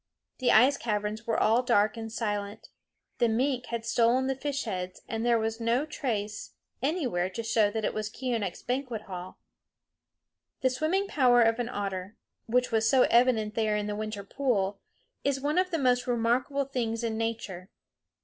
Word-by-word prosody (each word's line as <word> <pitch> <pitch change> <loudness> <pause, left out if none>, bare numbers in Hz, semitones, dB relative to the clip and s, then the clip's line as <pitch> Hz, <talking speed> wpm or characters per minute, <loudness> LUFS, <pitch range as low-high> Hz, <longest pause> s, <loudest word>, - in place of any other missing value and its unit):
The 250 - +3
ice 260 +6 +6
caverns 210 0 -3
were 225 - +1
all 225 +3 +4
dark 215 -4 +2
and 225 -1 -6
silent. 205 -2 -3 0.5
The 235 - +3
mink 250 +2 0
had 235 -1 -4
stolen 235 +2 +3
the 270 - +1
fish 275 +1 -3
heads, 185 -5 -5
and 225 0 -3
there 240 -1 +3
was 225 0 -2
no 235 +5 +1
trace 215 -9 -4 0.3
anywhere 255 - 0
to 230 +5 -5
show 225 -2 +3
that 220 0 -2
it - - -1
was 215 0 -3
Keeonekh's 230 -6 -3
banquet 250 -4 -3
hall. 185 -2 -8 1.2
The 260 - +3
swimming 315 +9 0
power 245 -8 +4
of 225 +1 +2
an 240 0 -1
otter, 200 -3 -4 0.3
which 250 +2 +1
was 220 0 +2
so 260 +1 +5
evident 235 -3 +3
there 215 -2 +1
in 210 - -2
the 210 0 -3
winter 215 -1 -4
pool, 200 -4 -1 0.4
is 275 -1 +1
one 295 +5 +1
of 370 0 +1
the 335 - -1
most 250 -3 +2
remarkable 245 +4 +1
things 235 -4 -2
in 225 -1 -1
nature. 220 -5 -4
230 Hz, 175 wpm, -28 LUFS, 215-255 Hz, 1.2 s, ice